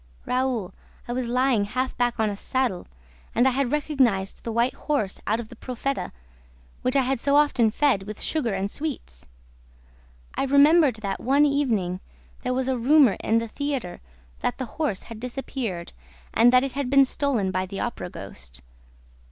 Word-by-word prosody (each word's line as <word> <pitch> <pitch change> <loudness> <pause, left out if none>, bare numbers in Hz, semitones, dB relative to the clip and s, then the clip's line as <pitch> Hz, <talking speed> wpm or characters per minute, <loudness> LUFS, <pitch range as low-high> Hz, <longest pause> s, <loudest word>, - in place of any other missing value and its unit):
Raoul, 250 -7 -1 0.3
I 240 - -3
was 250 -1 -2
lying 250 -3 +2
half 255 +5 -2
back 240 -1 0
on 215 -1 +2
a - - -4
saddle 250 -3 -1 0.5
and 240 +3 +4
I - - +4
had 265 -1 0
recognized 265 -10 0
the 230 - -3
white 235 +3 +1
horse 220 -11 -2
out 220 +2 +1
of 225 -2 -7
the - - -11
PROFETA, 255 +4 -3 0.7
which 255 - 0
I 270 - +4
had 260 0 0
so 280 +3 +2
often 290 -6 +4
fed 215 -5 +1
with 210 0 -7
sugar 295 -8 -1
and 195 +1 -2
sweets. 275 - -6 1.1
I - - -1
remembered 285 +1 +5
that, 195 -1 -2
one 280 +4 +3
evening, 225 -11 0 0.4
there 250 - -3
was 260 0 -1
a 260 -2 0
rumor 270 -2 +5
in 225 - +2
the 230 0 -1
theater 275 -6 -4 0.4
that - - -1
the 260 - -3 0.2
horse 215 -11 -1
had 230 -2 -9
disappeared 245 -7 -5 0.4
and 240 +2 +6
that 255 0 +5
it 275 - -2
had 275 -1 -3
been 275 0 +6
stolen 255 -8 0
by 185 0 -1
the 195 +1 -6
Opera 235 -6 -3
ghost. 60 - -10
245 Hz, 175 wpm, -25 LUFS, 210-275 Hz, 1.1 s, and